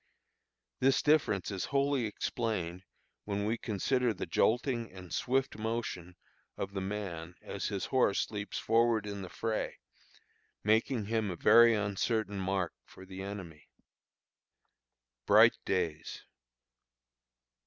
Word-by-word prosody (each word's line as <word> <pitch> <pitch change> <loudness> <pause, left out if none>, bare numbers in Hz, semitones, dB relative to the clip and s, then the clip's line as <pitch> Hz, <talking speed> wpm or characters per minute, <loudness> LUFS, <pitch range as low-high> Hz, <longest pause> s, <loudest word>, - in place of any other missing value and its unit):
This 135 +1 +3
difference 140 - +2
is 95 -2 -2
wholly 140 -3 +1
explained 100 -5 -3 0.4
when 100 0 -2
we 110 +2 +1
consider 120 +3 0
the - - -4
jolting 120 0 +1
and 90 -2 -10
swift 130 -3 0
motion 110 -6 -3 0.4
of 100 - -4
the 95 - -2
man 95 -4 -5
as 100 - -4
his 100 -3 -2
horse 125 -7 +1
leaps 105 -2 -4
forward 115 -1 +2
in 100 -1 -5
the 95 - -7
fray, 110 +3 -3 0.9
making 110 +2 +2
him 110 -1 0
a 90 - -3
very 115 +6 +6
uncertain 105 0 -1
mark 95 -2 -1
for 95 - -14
the 95 0 -8
enemy. 95 -7 -8 1.6
BRIGHT - - +6
DAYS. 80 -4 -2
105 Hz, 120 wpm, -32 LUFS, 95-115 Hz, 1.6 s, very